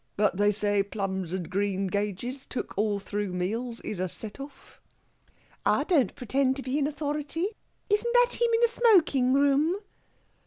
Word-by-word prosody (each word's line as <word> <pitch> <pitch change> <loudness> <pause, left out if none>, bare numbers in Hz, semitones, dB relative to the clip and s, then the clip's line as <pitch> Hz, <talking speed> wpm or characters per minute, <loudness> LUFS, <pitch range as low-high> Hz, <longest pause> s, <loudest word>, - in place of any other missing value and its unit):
But 205 -1 +2
they 205 +1 +4
say 205 -1 +1
plums 195 -3 -3
and 180 -3 -3
greengages, 200 +6 -2
took 255 - -5
all 210 0 +1
through 200 -1 -4
meals, 230 +7 -3
is 205 - -5
a 185 0 -1
set 215 +7 -8
off." 280 +1 -12 0.8
"I - - +3
don't 285 - +2
pretend 265 +2 +1
to 270 - -4
be 265 +3 -1
an 285 - +1
authority. 300 +4 -2 0.4
Isn't 440 +3 +1
that - - +4
him, 475 - +5
in 455 0 +2
the 475 - +6
smoking 365 - +4
room?" 285 +5 +3
250 Hz, 160 wpm, -27 LUFS, 200-295 Hz, 0.8 s, the